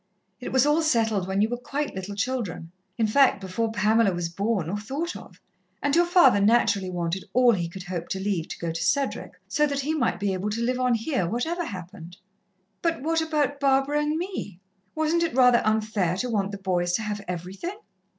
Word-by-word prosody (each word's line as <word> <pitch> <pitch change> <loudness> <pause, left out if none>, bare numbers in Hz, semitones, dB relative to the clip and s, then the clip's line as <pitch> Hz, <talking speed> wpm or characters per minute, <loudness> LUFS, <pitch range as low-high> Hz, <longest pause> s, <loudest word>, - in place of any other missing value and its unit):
It 250 - -6
was 260 0 +4
all 300 +2 +3
settled 225 - +1
when 190 +1 0
you 215 - +2
were 245 - -2
quite 275 +4 -3
little 190 +2 -6
children 205 -7 -3 0.3
in 225 - +2
fact, 255 +1 +4
before 200 +4 -2
Pamela 215 0 +3
was 175 -1 -3
born 195 -1 -1
or 200 +5 -2
thought 285 +11 -4
of - - -12 0.4
and 285 +1 +1
your 345 +1 +4
father 310 - +5
naturally 205 -3 +3
wanted 175 +1 -3
all 250 0 +5
he 175 -6 -1
could 190 +1 -8
hope 175 -2 -5
to 190 - -2
leave 190 -4 -1
to - - -7
go 170 -1 -3
to 165 0 -3
Cedric, 275 +9 -1
so 300 -1 +2
that 280 -1 -2
he 300 +4 -1
might 310 - 0
be 200 -1 0
able 190 +3 -2
to 225 +3 -2
live 250 +1 0
on 250 -1 +2
here, 225 - -1
whatever 325 - -2
happened." 180 - -9 0.6
"But 330 -5 -1
what 325 +1 +1
about 295 -3 0
Barbara 275 +1 +2
and 300 +1 0
me? 335 - -5 0.4
Wasn't 315 +2 +1
it 330 -6 -1
rather 250 -2 +6
unfair 215 -5 0
to 245 +4 -2
want 200 -2 0
the 200 - -5
boys 180 -2 -1
to 220 - 0
have 210 -1 -3
everything?" 185 - -5
220 Hz, 210 wpm, -25 LUFS, 190-280 Hz, 0.6 s, rather